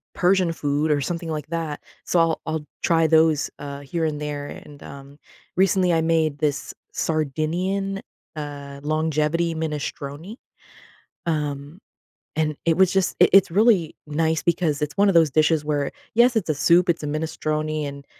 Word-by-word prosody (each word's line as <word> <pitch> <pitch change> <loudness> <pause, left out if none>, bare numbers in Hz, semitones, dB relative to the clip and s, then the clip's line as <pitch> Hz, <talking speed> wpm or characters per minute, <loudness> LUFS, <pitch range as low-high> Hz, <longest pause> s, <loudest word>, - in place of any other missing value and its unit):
Persian 180 -1 +3
food," 150 -1 0
or 145 - +2
something 170 +2 -3
like 150 -2 -4
that, 160 -3 -4 0.2
so 175 - +1
I'll 165 -1 +2
I'll 160 -1 -3 0.2
try 165 -1 +3
those, 160 -2 +3
uh, 140 -1 -7
here 160 +4 -3
and 150 -1 -2
there. 145 -1 -4
And, 145 -1 -11
um, 140 +1 -12 0.4
recently, 185 -1 +3
I 165 - +2
made 160 -3 +1
this, 145 -2 -1 0.2
Sardinian, 175 +6 -1 0.3
uh, 140 -2 -7
longevity 155 +2 0
minestrone, 155 +3 -5 0.9
um, 150 +1 -3 0.6
and 155 -1 0
it 165 -1 +2
was 190 -1 +4
just 190 -1 +1
it - - +6
it's 195 -2 +6
really 200 -4 +3
nice 160 +1 0
because 165 -4 0
it's 150 - -2
one 200 0 +4
of 190 - +1
those 160 -4 +5
dishes 155 0 +2
where, 145 -2 -1 0.2
yes, 240 +1 +4
it's 175 -6 -2
a - - +3
soup, 170 +5 +4
it's 165 -2 +1
a - - -3
minestrone, 155 0 -2
and 140 0 -9
155 Hz, 160 wpm, -23 LUFS, 150-170 Hz, 0.9 s, it